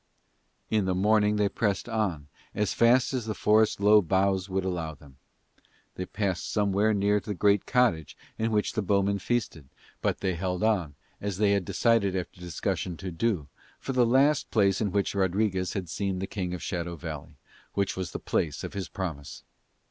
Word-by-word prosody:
In 105 -3 +2
the 95 -1 0
morning 105 +2 +3
they 105 -1 +2
pressed 100 0 -1
on 100 -11 -2 0.3
as 105 -1 0
fast 120 +3 +4
as 125 -4 -2
the 110 - -2
forest's 110 0 +3
low 105 +1 +6
boughs 95 +1 +1
would 95 0 -1
allow 85 -4 -3
them. 70 -1 -18 0.8
They 90 - -5
passed 100 -4 -2
somewhere 105 +1 +2
near 105 0 +2
the 105 0 -5
great 100 +1 +2
cottage 120 - +1 0.2
in 110 +1 -1
which 105 -2 0
the 110 - 0
bowmen 100 +1 +1
feasted; 95 - -2 0.3
but - - -1
they 95 - 0
held 90 +2 -2
on, 95 -10 +1 0.3
as 100 -2 -3
they 105 0 +3
had 100 -3 +1
decided 110 -4 +2
after 90 -1 -5
discussion 85 +1 -3
to 95 +1 -6
do, 85 -4 -1 0.3
for 135 - -4
the 125 -1 +4
last 140 +4 +3
place 100 -3 +2
in 105 -3 0
which 100 0 0
Rodriguez 95 -1 0
had 95 -3 -3
seen 95 +3 -2
the 95 - -2
King 90 -3 -4
of 90 - -8
Shadow 85 -2 -3
Valley, 80 -1 -7 0.4
which 100 -1 0
was 95 -2 -3
the - - -5
place 75 -4 -2
of - - -6
his 95 -3 -4
promise. 80 -7 -6
100 Hz, 185 wpm, -27 LUFS, 90-105 Hz, 0.8 s, low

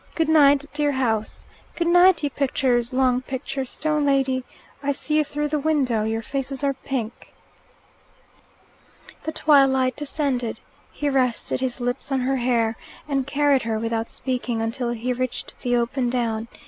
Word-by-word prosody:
"Goodnight, 295 -3 +4
dear 290 -1 +1
house. 225 -5 -1 0.3
Good 340 - -1
night, 355 0 +5
you 290 - 0
pictures 255 -3 0
long 255 -1 +2
picture 265 +1 -4
stone 300 +3 -1
lady. 270 -2 +1 0.4
I 285 0 0
see 300 +2 0
you 305 - +4
through 295 0 -3
the 300 0 0
window 270 -8 +1
your 225 +1 -2
faces 270 +2 -4
are 280 -1 +2
pink." 260 -4 -5 1.9
The 315 - -1
twilight 270 -4 +4
descended. 275 -5 -2 0.3
He 295 - -3
rested 255 -4 0
his 260 -1 -2
lips 245 +3 -3
on 265 -1 +1
her 265 +2 0
hair, 235 -2 +1 0.3
and 275 -2 -1
carried 285 -1 +3
her, 225 -1 -2
without 225 0 -2
speaking, 250 -3 -3
until 230 +2 -2
he 240 +1 -2
reached 255 0 -4
the 245 -1 +1
open 240 +1 0
down. 230 -2 -1
265 Hz, 150 wpm, -23 LUFS, 240-285 Hz, 1.9 s, night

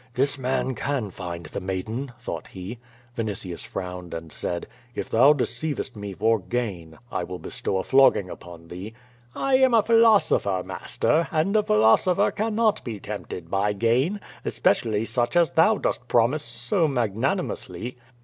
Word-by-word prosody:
"This 140 +3 +2
man 130 0 0
can 125 -3 -2
find 85 -2 -6
the 75 - -5
maiden," 110 +8 -4
thought - - -6
he. 95 +6 -8 0.4
Vi 115 - -1
nitius 100 -5 -5
frowned 90 -2 -6
and 80 -1 -7
said, 85 -1 -3 0.3
"If - - -4
thou 130 +6 +7
deceivest 130 -1 -2
me 100 -1 -6
for 110 +3 +2
gain, 95 -8 -4
I 90 - -1
will 90 +1 -6
bestow 95 - -3
a 95 - -1
flogging 135 -8 +4
upon 85 -2 -11
thee." 95 +6 -8 0.4
"I 270 -1 +3
am 260 -2 +4
a 220 - +5
philosopher, 215 - +4
master, 160 0 0
and 165 +7 +1
a 215 - +5
philosopher 110 - +4
cannot 220 0 +1
be 110 -4 -5
tempted 85 -2 -7
by 100 +1 +1
gain, 125 - +1 0.2
especially 110 -1 +1
such 120 +5 -1
as 170 -2 +4
thou 210 +7 +4
dost 120 - -2
promise 120 +6 +3
so 125 - 0
mag 120 -8 -1
nanimously." 125 - -2
115 Hz, 160 wpm, -25 LUFS, 95-150 Hz, 0.4 s, thou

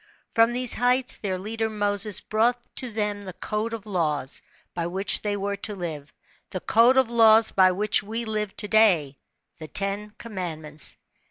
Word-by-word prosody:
From 230 0 +4
these 250 0 0
heights 250 +1 +1
their 190 -3 -2
leader 220 +3 -3
Moses 205 -1 0
brought 230 +3 +1 0.2
to 255 - -1
them 210 -1 -2
the 190 -2 -8
c^de 215 +4 -3
of 225 -2 -6
laws, 155 -9 -2 0.3
by 170 -1 -2
which 190 +3 +1
they 205 -1 -2
were 200 0 -3
to 210 +1 -4
live, 160 -6 -6 0.4
the 185 - -4
code 235 +7 +4
of 260 -3 +3
laws 225 -1 +6
by 185 -1 +5
which 205 +3 +1
we 225 +3 -5
Irve 215 -2 -3
to 210 - -1
day 180 -11 +3 0.4
the 155 - -8
Ten 200 +5 -2
Commandments. 165 -8 -3
210 Hz, 170 wpm, -25 LUFS, 185-225 Hz, 0.4 s, laws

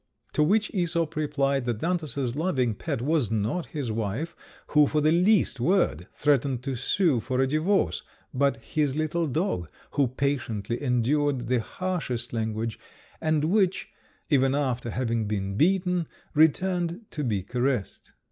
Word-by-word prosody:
To - - +2
which 205 +8 +3
Æsop 170 -4 0
replied, 140 -3 0
that 120 -3 -1
Xantus's 140 -7 -1
loving 145 -8 +1
pet 115 +3 -3
was 150 -5 +1
not 110 - -1
his 140 -7 -4
wife, 115 +9 -3 0.3
who 150 -1 +5
for 155 - +1
the 155 +1 +3
least 180 - +3
word 120 - +1
threatened 135 -3 +1
to 135 -1 -2
sue 145 - +2
for 130 +3 -2
a 135 - +4
divorce, 155 +9 +1 0.3
but 140 -1 +2
his 145 -1 0
little 155 +2 0
dog, 135 - -1 0.2
who 140 -2 +2
patiently 120 -4 -2
endured 130 0 +1
the 125 -1 +3
harshest 130 -5 -3
language, 110 0 -2 0.4
and 155 -2 +1
which, 190 +2 +1 0.4
even 135 -1 +4
after 125 -4 -1
having 115 -2 -1
been 100 -2 -2
beaten, 180 - +2 0.3
returned 175 +4 +2
to 150 - -3
be 105 -7 -1
caressed. 125 0 -2
140 Hz, 145 wpm, -26 LUFS, 120-165 Hz, 0.4 s, who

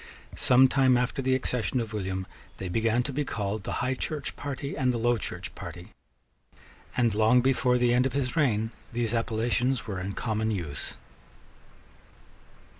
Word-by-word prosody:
Some 130 +1 +6
time 130 -1 +4
after 125 +2 -1
the 130 0 +2
accession 125 -2 0
of 115 -2 -4
William 95 -2 -2 0.3
they 95 - -5
began 115 +5 +2
to 140 - -4
be 150 +3 0
called 105 -5 -3
the - - -3
High 130 - +1
Church 145 +2 -4
party 140 0 -4
and 130 -4 +2
the 120 - -1
Low 120 0 +2
Church - - -5
party; 85 0 -9 1.1
and, 120 -3 +3
long 110 +4 +4
before 125 -1 +3
the 120 -1 +3
end 125 +2 +4
of 130 - -6
his 135 -2 -1
reign, 110 -8 +2 0.2
these 120 -1 -1
appellations 120 +2 0
were 100 -4 -4
in 95 +2 -4
common 110 0 -1
use. 85 -9 -3
120 Hz, 165 wpm, -28 LUFS, 110-130 Hz, 1.1 s, Some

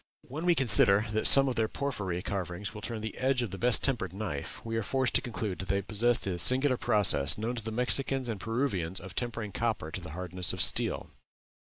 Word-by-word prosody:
When 155 +7 -7
we 175 - +3
consider 105 -5 +4
that 110 0 +2
some 135 0 +10
of 130 - -3
their 110 -1 0
porphyry 95 -10 -5
carvings 95 0 -5
will 105 - -10
turn 115 0 -6
the 110 0 -7
edge 130 -1 0
of 110 - -6
the 95 - -8
best 120 -1 +3
tempered 110 -10 -1
knife, 95 -9 -6
we 115 0 -5
are 115 - -1
forced 130 +4 -2
to - - +2
conclude 110 -5 -6
that 95 - -7
they 100 - 0
possessed 115 +4 0
that 90 -3 -4
singular 130 - +3
process, 105 - +2
known 110 +3 -4
to 115 - -6
the 110 - -6
Mexicans 130 +2 -1
and 110 -4 -5
Peruvians 100 -8 -3
of 95 0 -11
tempering 115 -1 -5
copper 110 -8 -3
to 95 - -6
the 85 -3 -9
hardness 90 0 -2
of - - -7
steel. - - +1
110 Hz, 220 wpm, -28 LUFS, 95-125 Hz, -, some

